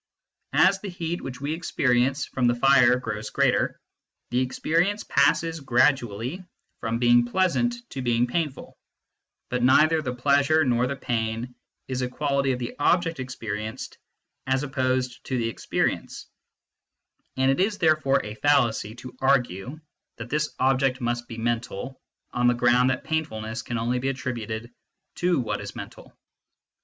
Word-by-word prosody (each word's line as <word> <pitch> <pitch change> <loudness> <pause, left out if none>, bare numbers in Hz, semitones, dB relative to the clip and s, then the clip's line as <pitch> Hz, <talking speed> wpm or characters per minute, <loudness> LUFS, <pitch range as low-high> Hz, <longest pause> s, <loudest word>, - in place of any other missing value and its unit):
As 195 +1 +5
the 205 - -5
heat 175 -1 -4
which 125 -1 -7
we 145 +3 -2
experience 135 -5 +1
from 125 -2 0
the 120 - +3
fire 125 -1 +5
grows 110 -4 -5
greater, - - +1 0.5
the 125 - +2
experience 170 +10 0
passes 160 +4 +2
gradually 130 - +1 0.4
from 115 0 -2
being 120 0 +5
pleasant 235 - 0
to 135 - -4
being 120 -1 +2
painful, 145 +2 -4 0.7
but 125 0 0
neither 155 +6 +5
the 125 -4 -4
pleasure 140 +4 +3
nor 125 -1 +2
the 140 - -3
pain 115 -1 -3 0.3
is 130 -1 -2
a 125 - -1
quality 140 0 0
of 125 - -1
the 120 -1 -5
object 165 +1 +2
experienced 110 -4 -5 0.5
as 135 +1 +1
opposed 130 -2 -1
to 130 - -2
the 115 -1 0
experience, - - -2 1.1
and 130 +1 +3
it 135 - 0
is 205 +2 +1
therefore 155 -5 +3
a 105 - -6
fallacy 115 -4 +1
to 125 +1 -10
argue 130 - +1 0.4
that 115 +1 -8
this 150 +1 0
object 130 0 +2
must 120 -1 -2
be 115 - -8
mental 120 +2 -3 0.3
on 120 0 +2
the 120 - +4
ground 125 +1 +4
that 130 -1 -1
painfulness 120 -8 -3
can 120 -1 -4
only 120 +2 0
be 135 +2 -1
attributed 120 -3 -4 0.4
to 175 -3 +1
what 120 - -2
is - - -8
mental. - - -9
130 Hz, 150 wpm, -25 LUFS, 120-145 Hz, 1.1 s, As